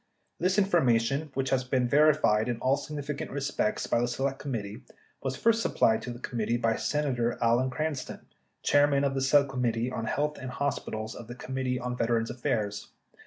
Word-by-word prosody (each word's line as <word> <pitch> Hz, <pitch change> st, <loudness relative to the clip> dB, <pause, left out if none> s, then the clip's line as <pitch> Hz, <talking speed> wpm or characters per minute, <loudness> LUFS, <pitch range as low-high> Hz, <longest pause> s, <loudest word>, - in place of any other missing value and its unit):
This 185 Hz, +3 st, +1 dB
informa 170 Hz, -, +4 dB
tion, 135 Hz, +7 st, -2 dB
which 135 Hz, 0 st, -1 dB
has 130 Hz, -1 st, +2 dB
been 130 Hz, -1 st, +1 dB
verified 140 Hz, -6 st, +4 dB
in 120 Hz, -, -1 dB
all 130 Hz, +3 st, +2 dB
significant 145 Hz, 0 st, -5 dB
respects 140 Hz, -5 st, -1 dB
by 120 Hz, -, +1 dB
the 120 Hz, -, +1 dB
Select 135 Hz, +2 st, -2 dB
Committee, 115 Hz, -4 st, -5 dB, 0.4 s
was 130 Hz, -1 st, -2 dB
first 230 Hz, -, +2 dB
supplied 110 Hz, -, +2 dB
to -, -, -6 dB
the 120 Hz, -, -6 dB
committee 120 Hz, -1 st, -2 dB
by 115 Hz, -2 st, +1 dB
Senator 125 Hz, -6 st, 0 dB
Alan 120 Hz, +3 st, +2 dB
Cran 155 Hz, +4 st, -1 dB
ston, 130 Hz, -2 st, -7 dB, 0.4 s
chairman 145 Hz, -1 st, +4 dB
of 140 Hz, -1 st, +1 dB
the 135 Hz, -, -1 dB
Subcommittee 130 Hz, -4 st, +2 dB
on 115 Hz, -2 st, -3 dB
Health 150 Hz, +6 st, -1 dB
and 130 Hz, -, -6 dB
Hospitals 110 Hz, -5 st, -3 dB
of 120 Hz, -, -10 dB
the 120 Hz, -, -8 dB
Committee 130 Hz, 0 st, -3 dB
on 125 Hz, 0 st, -3 dB
Veterans' 115 Hz, -1 st, 0 dB
Affairs. 105 Hz, -4 st, -2 dB
130 Hz, 180 wpm, -28 LUFS, 115-140 Hz, 0.4 s, informa